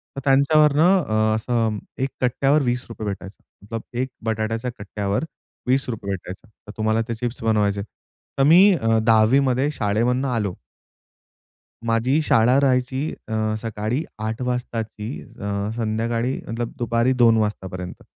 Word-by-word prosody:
तर 135 Hz, -, -5 dB
त्यांच्यावरनं 150 Hz, +6 st, +5 dB
अ, 110 Hz, -3 st, +1 dB
असं 115 Hz, -1 st, 0 dB, 0.3 s
एक 135 Hz, -, 0 dB
कट्ट्यावर 135 Hz, +4 st, +2 dB
₹20 120 Hz, -3 st, -3 dB
भेटायचा. 100 Hz, +2 st, -8 dB, 0.2 s
एक 130 Hz, +1 st, -1 dB, 0.2 s
बटाट्याच्या 115 Hz, +2 st, -1 dB
कट्ट्यावर 100 Hz, +4 st, -2 dB, 0.4 s
₹20 125 Hz, -6 st, -1 dB
भेटायचा 95 Hz, +3 st, -7 dB, 0.2 s
तर -, -, -7 dB
तुम्हाला 110 Hz, +1 st, +1 dB
ते 120 Hz, -, -2 dB
चिप्स 120 Hz, +2 st, -4 dB
बनवायचे. 105 Hz, -2 st, +1 dB
तर 110 Hz, +5 st, -7 dB
मी 180 Hz, +8 st, +7 dB
अ, 115 Hz, -9 st, +2 dB
10वी 115 Hz, +3 st, +5 dB
मध्ये 135 Hz, +1 st, +1 dB
शाळेमधून 120 Hz, +2 st, 0 dB
आलो. 105 Hz, -6 st, -1 dB, 1.3 s
माझी 115 Hz, +6 st, +2 dB
शाळा 125 Hz, -2 st, +4 dB
राहायची 130 Hz, +2 st, +1 dB, 0.2 s
अ, 110 Hz, 0 st, -1 dB
सकाळी 115 Hz, +5 st, -2 dB, 0.2 s
8.00 110 Hz, +2 st, -3 dB
वाजताची 115 Hz, -8 st, -4 dB
अ, 70 Hz, -, -16 dB, 0.4 s
संध्याकाळी 115 Hz, +2 st, -1 dB
मतलब 115 Hz, +1 st, -3 dB
दुपारी 120 Hz, +1 st, +1 dB
2.00 120 Hz, -3 st, +5 dB
वाजतापर्यंत. 95 Hz, -4 st, -3 dB
115 Hz, 125 wpm, -22 LUFS, 110-130 Hz, 1.3 s, मी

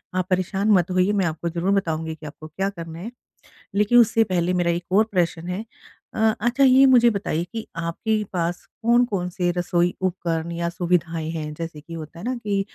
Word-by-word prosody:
आप 185 Hz, -1 st, 0 dB
परेशान 190 Hz, +3 st, +1 dB
मत 185 Hz, -3 st, +3 dB
होइए 185 Hz, +2 st, +2 dB
मैं 195 Hz, -3 st, +1 dB
आपको 165 Hz, +1 st, -2 dB
ज़रूर 175 Hz, +3 st, -1 dB
बताऊँगी 160 Hz, -4 st, -1 dB
कि 155 Hz, -, -13 dB
आपको 155 Hz, +1 st, -9 dB
क्या 190 Hz, +5 st, -2 dB
करना 165 Hz, -4 st, -8 dB
है। 215 Hz, +7 st, -6 dB, 0.6 s
लेकिन 210 Hz, +4 st, +4 dB
उससे 225 Hz, -1 st, +4 dB
पहले 175 Hz, 0 st, +1 dB
मेरा 175 Hz, -1 st, +2 dB
एक 170 Hz, +1 st, -5 dB
और 205 Hz, +3 st, +5 dB
प्रश्न 175 Hz, -2 st, 0 dB
है 185 Hz, +5 st, -4 dB, 0.5 s
अ, -, -, -5 dB, 0.2 s
अच्छा 240 Hz, +4 st, +2 dB
ये 265 Hz, 0 st, +7 dB
मुझे 245 Hz, -3 st, +6 dB
बताइए 195 Hz, -6 st, -2 dB
कि 225 Hz, -1 st, -4 dB
आपके 190 Hz, +6 st, -1 dB
पास 175 Hz, 0 st, -2 dB, 0.2 s
कौन-कौन 230 Hz, -6 st, +2 dB
से 180 Hz, 0 st, -1 dB
रसोई 175 Hz, 0 st, +1 dB
उपकरण 170 Hz, -3 st, -2 dB
या 170 Hz, 0 st, -2 dB
सुविधाएँ 170 Hz, -2 st, -1 dB
हैं? 155 Hz, -2 st, -4 dB
जैसे 165 Hz, -1 st, -7 dB
कि 165 Hz, +2 st, -11 dB
होता 160 Hz, 0 st, -8 dB
है 185 Hz, -, -8 dB
ना 255 Hz, +1 st, -1 dB
कि 205 Hz, -4 st, -1 dB
180 Hz, 200 wpm, -23 LUFS, 170-205 Hz, 0.6 s, ये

